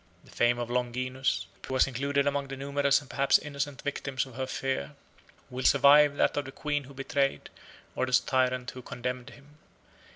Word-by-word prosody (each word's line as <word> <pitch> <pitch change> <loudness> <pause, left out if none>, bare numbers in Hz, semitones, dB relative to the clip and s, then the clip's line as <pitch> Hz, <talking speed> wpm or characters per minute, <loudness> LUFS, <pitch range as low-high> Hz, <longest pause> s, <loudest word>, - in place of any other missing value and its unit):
The - - -17
fame 120 0 +2
of 120 0 -4
Longinus, 125 +2 -1 0.2
who 130 - -3
was 130 - +5
included 140 +2 0
among 140 -1 0
the 135 0 -7
numerous 140 +1 +1
and 140 - -15
perhaps 135 +1 +3
innocent 145 -2 -5
victims 140 -2 -2
of 130 - -13
her 130 +2 -4
fear, 130 - -3 0.6
will 130 +1 -4
survive 145 +2 +6
that - - +2
of 145 - -1
the 135 - -8
queen 145 0 -2
who 140 +1 -14
betrayed, 135 +1 -1 0.4
or 130 - 0
the 125 - +4
tyrant 130 -1 0
who 130 - -9
condemned 125 0 -5
him. 145 +2 -18
135 Hz, 185 wpm, -29 LUFS, 125-140 Hz, 0.6 s, survive